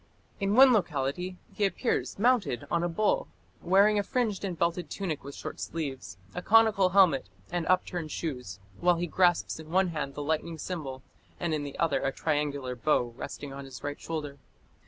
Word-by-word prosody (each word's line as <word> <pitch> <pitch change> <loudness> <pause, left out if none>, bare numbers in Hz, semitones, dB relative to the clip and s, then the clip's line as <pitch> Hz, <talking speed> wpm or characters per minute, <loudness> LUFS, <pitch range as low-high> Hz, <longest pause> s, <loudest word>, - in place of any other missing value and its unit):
In 200 0 +1
one 260 0 +8
locality 180 - -1 0.2
he 210 - -2
appears 200 +5 0
mounted 220 - +2
on 170 - +2
a 175 - 0
bull 215 - +1 0.3
wearing 200 +3 +4
a - - +3
fringed 230 -5 -1
and 185 -4 -3
belted 170 -1 0
tunic 170 -5 -3
with 140 +1 -8
short - - -7
sleeves, 135 - -5 0.2
a 180 - -4
conical 215 -2 +5
helmet, 180 - +4 0.2
and 175 -1 -1
upturned 180 -3 0
shoes, 125 - -4 0.2
while 175 0 +4
he 170 +1 -1
grasps 175 -1 +2
in 155 -1 -10
one 185 +2 +3
hand 150 -4 -4
the 145 - -4
lightning 160 +2 -1
symbol, 145 -7 -5 0.4
and 170 -2 -1
in 155 - 0
the 140 -1 -6
other 165 - +1
a 135 - 0
triangular 145 -4 -1
bow 120 -2 +1
resting 140 +2 -7
on 140 0 -7
his 130 -3 -10
right 145 0 -4
shoulder. 150 -3 -5
165 Hz, 180 wpm, -29 LUFS, 140-190 Hz, 0.4 s, one